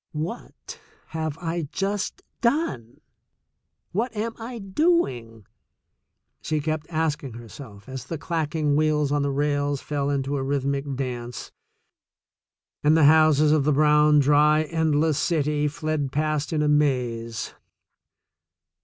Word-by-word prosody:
*'What 160 Hz, +10 st, -6 dB, 0.3 s
have 160 Hz, -1 st, -3 dB
I 165 Hz, -2 st, -3 dB
just 195 Hz, +1 st, -3 dB, 0.2 s
done? 235 Hz, -, -1 dB, 0.9 s
What 230 Hz, +7 st, -1 dB
am 225 Hz, +2 st, -2 dB
I 235 Hz, +2 st, -6 dB
doing?" 190 Hz, -, 0 dB, 1.0 s
she 155 Hz, 0 st, -1 dB
kept 155 Hz, 0 st, -3 dB
asking 155 Hz, -5 st, -2 dB
herself 115 Hz, -2 st, -11 dB
as 130 Hz, -1 st, -7 dB
the 165 Hz, +4 st, -5 dB
clacking 155 Hz, -2 st, -1 dB
wheels 150 Hz, -1 st, +1 dB
on 145 Hz, 0 st, +1 dB
the 140 Hz, -, 0 dB
rails 145 Hz, 0 st, 0 dB
fell 145 Hz, -1 st, -2 dB
into 140 Hz, 0 st, -1 dB
a 135 Hz, -, -2 dB
rhythmic 140 Hz, 0 st, -1 dB
dance 125 Hz, -2 st, -5 dB, 1.3 s
and 155 Hz, +2 st, +5 dB
the 160 Hz, -, +4 dB
houses 155 Hz, -1 st, +5 dB
of 155 Hz, -2 st, +3 dB
the 150 Hz, -, +2 dB
brown, 150 Hz, +1 st, +4 dB
dry, 150 Hz, +2 st, +4 dB
endless 155 Hz, -1 st, +1 dB
city 150 Hz, -3 st, +1 dB
fled 150 Hz, -2 st, -2 dB
past 155 Hz, +1 st, -1 dB
in 155 Hz, -2 st, +1 dB
a -, -, +1 dB
maze. 120 Hz, -7 st, 0 dB
150 Hz, 125 wpm, -24 LUFS, 140-160 Hz, 1.3 s, and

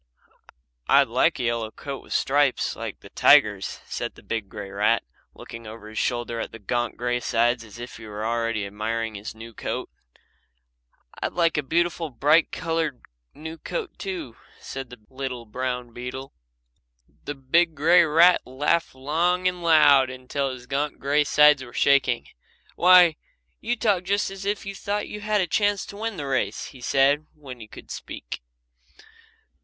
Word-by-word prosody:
"I'd -, -, +5 dB
like -, -, +2 dB
a -, -, -2 dB
yellow 115 Hz, -2 st, -1 dB
coat 140 Hz, +4 st, -7 dB
with -, -, -18 dB
stripes 140 Hz, -1 st, +1 dB
like -, -, -7 dB
the -, -, -14 dB
tiger's," -, -, +4 dB
said -, -, -5 dB
the -, -, -16 dB
big 110 Hz, -4 st, -4 dB
grey 100 Hz, -2 st, -8 dB
rat, 100 Hz, +2 st, +2 dB, 0.3 s
looking 115 Hz, -1 st, -10 dB
over 110 Hz, 0 st, -10 dB
his 110 Hz, -, -4 dB
shoulder 120 Hz, -1 st, -1 dB
at -, -, -4 dB
his 115 Hz, -2 st, -12 dB
gaunt 120 Hz, +3 st, -1 dB
grey 120 Hz, +1 st, -1 dB
sides 120 Hz, 0 st, +1 dB
as 110 Hz, -1 st, -13 dB
if 120 Hz, +1 st, -8 dB
he 110 Hz, -1 st, -11 dB
were 105 Hz, +1 st, -5 dB
already 115 Hz, -2 st, -1 dB
admiring 110 Hz, +2 st, -3 dB
his 105 Hz, +2 st, -7 dB
new 115 Hz, +1 st, -10 dB
coat. -, -, -4 dB, 1.3 s
"I'd -, -, -2 dB
like 170 Hz, -2 st, +2 dB
a 150 Hz, -, +1 dB
beautiful, 170 Hz, +2 st, 0 dB
bright 145 Hz, +6 st, +3 dB
coloured 160 Hz, -6 st, -2 dB, 0.3 s
new 160 Hz, +2 st, -8 dB
coat, 445 Hz, -7 st, -5 dB
too," 180 Hz, -, -5 dB, 0.2 s
said 135 Hz, -2 st, -7 dB
the 125 Hz, -, -11 dB
little 130 Hz, -3 st, -5 dB
brown 125 Hz, +1 st, -4 dB
beetle. 125 Hz, +3 st, -7 dB, 0.9 s
The 145 Hz, -, -4 dB
big 160 Hz, +5 st, +2 dB
grey 170 Hz, +4 st, +5 dB
rat 165 Hz, +3 st, +5 dB
laughed 145 Hz, +4 st, 0 dB
long 170 Hz, +7 st, +1 dB
and 180 Hz, -1 st, -2 dB
loud 145 Hz, -5 st, +6 dB
until 130 Hz, +2 st, -3 dB
his 130 Hz, -1 st, -8 dB
gaunt 140 Hz, +3 st, -2 dB
grey 145 Hz, +2 st, +2 dB
sides 150 Hz, -1 st, +5 dB
were 120 Hz, -, -12 dB
shaking. 140 Hz, -4 st, +3 dB, 0.5 s
"Why, 180 Hz, -2 st, +6 dB, 0.4 s
you 235 Hz, +2 st, -1 dB
talk 205 Hz, -6 st, +1 dB
just 200 Hz, +1 st, 0 dB
as 195 Hz, 0 st, -8 dB
if 205 Hz, 0 st, -2 dB
you 195 Hz, -, -5 dB
thought 205 Hz, +1 st, -3 dB
you 210 Hz, -, -7 dB
had 210 Hz, -1 st, +1 dB
a -, -, +2 dB
chance 205 Hz, +3 st, +1 dB
to 200 Hz, -, -10 dB
win 220 Hz, -2 st, -3 dB
the 145 Hz, -, -4 dB
race," 135 Hz, -1 st, -1 dB
he 130 Hz, -, -13 dB
said, 140 Hz, +5 st, +2 dB
when 135 Hz, -5 st, -10 dB
he 110 Hz, -, -10 dB
could -, -, -12 dB
speak. -, -, -7 dB
135 Hz, 170 wpm, -25 LUFS, 120-170 Hz, 1.3 s, loud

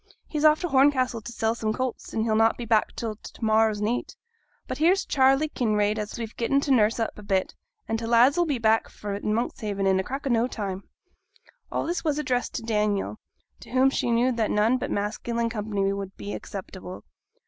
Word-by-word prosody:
He's 300 Hz, -2 st, -3 dB
off 305 Hz, 0 st, +6 dB
to 355 Hz, -, -1 dB
Horncastle 265 Hz, -4 st, +3 dB
t' 240 Hz, -, -8 dB
sell 225 Hz, -1 st, 0 dB
some 220 Hz, -2 st, -2 dB
colts, 255 Hz, 0 st, -4 dB
and 220 Hz, -, -1 dB
he'll 220 Hz, -1 st, +1 dB
not 225 Hz, +1 st, +3 dB
be 240 Hz, -, -5 dB
back 220 Hz, -1 st, +2 dB
till 220 Hz, -3 st, -4 dB
to 230 Hz, -, -12 dB
morrow's 220 Hz, -1 st, +3 dB
neet. 230 Hz, +4 st, -2 dB, 0.5 s
But -, -, -5 dB
here's 365 Hz, +5 st, +3 dB
Charley 270 Hz, +2 st, +3 dB
Kinraid 215 Hz, -6 st, 0 dB
as 210 Hz, 0 st, -5 dB
we've 230 Hz, -1 st, -6 dB
getten 275 Hz, +4 st, +1 dB
to 280 Hz, -, -1 dB
nurse 225 Hz, -3 st, +3 dB
up 225 Hz, -2 st, -2 dB
a -, -, -9 dB
bit, 195 Hz, -2 st, 0 dB, 0.3 s
and' 225 Hz, 0 st, -1 dB
t' 225 Hz, -, -4 dB
lads 240 Hz, +4 st, +5 dB
'll 350 Hz, -, +2 dB
be 285 Hz, -4 st, 0 dB
back 225 Hz, -1 st, +2 dB
fra' 205 Hz, -1 st, -6 dB
Monkshaven 210 Hz, -2 st, -2 dB
in 190 Hz, -1 st, +3 dB
a -, -, 0 dB
crack 270 Hz, +7 st, -5 dB
o' 270 Hz, -, 0 dB
no 235 Hz, +1 st, +2 dB
time.' 200 Hz, -5 st, -5 dB, 0.9 s
All -, -, -1 dB
this 345 Hz, +2 st, -2 dB
was 300 Hz, -3 st, 0 dB
addressed 255 Hz, -5 st, -1 dB
to -, -, -3 dB
Daniel, 210 Hz, -1 st, -1 dB, 0.4 s
to -, -, -13 dB
whom 260 Hz, +1 st, +3 dB
she 245 Hz, -, -1 dB
knew 240 Hz, +2 st, +3 dB
that 230 Hz, -3 st, 0 dB
none 220 Hz, +5 st, +2 dB
but -, -, -3 dB
masculine 230 Hz, +3 st, -2 dB
company 205 Hz, -3 st, -1 dB
would 195 Hz, 0 st, -6 dB
be 205 Hz, -, -6 dB
acceptable. 185 Hz, -2 st, -8 dB
225 Hz, 210 wpm, -26 LUFS, 210-255 Hz, 0.9 s, off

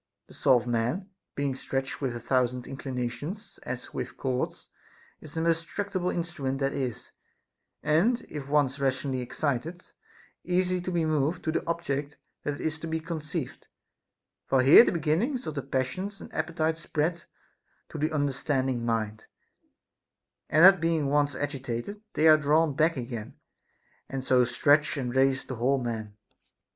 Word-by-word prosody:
The -, -, -17 dB
soul 130 Hz, -, +4 dB
of 120 Hz, -, -3 dB
man, 120 Hz, -, -1 dB, 0.2 s
being 140 Hz, -1 st, 0 dB
stretched 135 Hz, +1 st, -3 dB
with 130 Hz, -4 st, -1 dB
a -, -, -4 dB
thousand 125 Hz, 0 st, 0 dB
inclinations, 135 Hz, -, -5 dB
as 125 Hz, 0 st, -6 dB
with -, -, -5 dB
cords, 130 Hz, -1 st, -3 dB, 0.5 s
is 155 Hz, -1 st, -12 dB
the 160 Hz, -, 0 dB
most 165 Hz, 0 st, +1 dB
tractable 190 Hz, -1 st, -2 dB
instrument 165 Hz, -7 st, -2 dB
that 135 Hz, 0 st, 0 dB
is, 130 Hz, -4 st, -4 dB, 0.7 s
and 175 Hz, +11 st, +3 dB
if 145 Hz, -3 st, -7 dB
once 140 Hz, -1 st, +2 dB
rationally 135 Hz, -1 st, 0 dB
excited, 150 Hz, +6 st, -3 dB, 0.6 s
easy 180 Hz, 0 st, +1 dB
to 185 Hz, -, -4 dB
be 170 Hz, -2 st, +1 dB
moved 155 Hz, +1 st, 0 dB
to 160 Hz, -, 0 dB
the -, -, -1 dB
object 150 Hz, -4 st, -2 dB, 0.2 s
that 145 Hz, -1 st, -3 dB
is 160 Hz, 0 st, -2 dB
to 165 Hz, -, -5 dB
be 160 Hz, 0 st, -1 dB
conceived; 160 Hz, -3 st, -5 dB, 0.8 s
for 130 Hz, -1 st, +3 dB
here 140 Hz, -, +10 dB
the -, -, +1 dB
beginnings 185 Hz, -, 0 dB
of 155 Hz, -, -3 dB
the 140 Hz, -, -3 dB
passions 140 Hz, +10 st, -3 dB
and -, -, -11 dB
appetites 160 Hz, 0 st, -1 dB
spread 165 Hz, +1 st, -1 dB, 0.6 s
to -, -, -6 dB
the 155 Hz, +2 st, 0 dB
understanding 135 Hz, -3 st, 0 dB
mind, 110 Hz, -2 st, -2 dB, 1.2 s
and 155 Hz, +4 st, +7 dB
that 195 Hz, -2 st, +8 dB
being 165 Hz, -4 st, +1 dB
once 145 Hz, -1 st, +2 dB
agitated, 140 Hz, -, -4 dB
they 160 Hz, -, +3 dB
are 155 Hz, 0 st, +9 dB
drawn 150 Hz, 0 st, +2 dB
back 160 Hz, +1 st, +2 dB
again, 120 Hz, -3 st, -5 dB, 0.7 s
and 135 Hz, -1 st, -4 dB
so 125 Hz, -1 st, +4 dB
stretch 145 Hz, +5 st, +3 dB
and 125 Hz, -2 st, -3 dB
raise 135 Hz, 0 st, +3 dB
the 130 Hz, -, -6 dB
whole 130 Hz, +4 st, +2 dB
man. 110 Hz, -4 st, -4 dB
145 Hz, 155 wpm, -28 LUFS, 130-165 Hz, 1.2 s, here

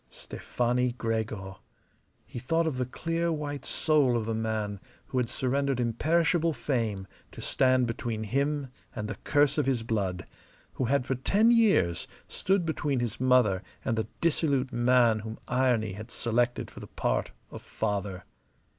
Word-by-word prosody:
Stefani 125 Hz, 0 st, -1 dB
Gregor! 110 Hz, -5 st, -3 dB, 0.7 s
He -, -, -7 dB
thought 165 Hz, +7 st, +1 dB
of 155 Hz, -5 st, -1 dB
the 125 Hz, -1 st, -1 dB
clear 165 Hz, +5 st, -1 dB
white 145 Hz, -2 st, -4 dB
soul 145 Hz, -6 st, +3 dB
of 110 Hz, -, -2 dB
the 115 Hz, -, -1 dB
man 110 Hz, -2 st, -2 dB, 0.3 s
who 130 Hz, -, 0 dB
had 120 Hz, -2 st, 0 dB
surrendered 135 Hz, +1 st, 0 dB
imperishable 160 Hz, +7 st, +2 dB
fame 115 Hz, -7 st, -2 dB, 0.3 s
to -, -, -11 dB
stand 130 Hz, -1 st, +3 dB
between 115 Hz, -1 st, -3 dB
him 140 Hz, +5 st, -1 dB, 0.3 s
and 105 Hz, -, -3 dB
the 110 Hz, -, -3 dB
curse 145 Hz, 0 st, +3 dB
of 145 Hz, -, +1 dB
his 125 Hz, -4 st, +1 dB
blood; 100 Hz, -5 st, -2 dB, 0.5 s
who 130 Hz, -, -1 dB
had 130 Hz, +1 st, +1 dB
for 135 Hz, -, 0 dB
ten 205 Hz, -, +3 dB
years 200 Hz, -, +3 dB, 0.2 s
stood 190 Hz, -2 st, 0 dB
between 145 Hz, -4 st, -1 dB
his 120 Hz, -3 st, -3 dB
mother 125 Hz, -7 st, +4 dB, 0.2 s
and 115 Hz, -, +1 dB
the 110 Hz, -2 st, -1 dB
dissolute 145 Hz, -5 st, +1 dB
man 120 Hz, -2 st, +4 dB
whom 110 Hz, +1 st, -7 dB
irony 125 Hz, -4 st, +2 dB
had 110 Hz, +4 st, -8 dB
selected 120 Hz, +1 st, 0 dB
for -, -, -11 dB
the -, -, -9 dB
part -, -, -1 dB, 0.2 s
of -, -, -8 dB
father. 100 Hz, -2 st, -3 dB
125 Hz, 155 wpm, -28 LUFS, 110-140 Hz, 0.7 s, mother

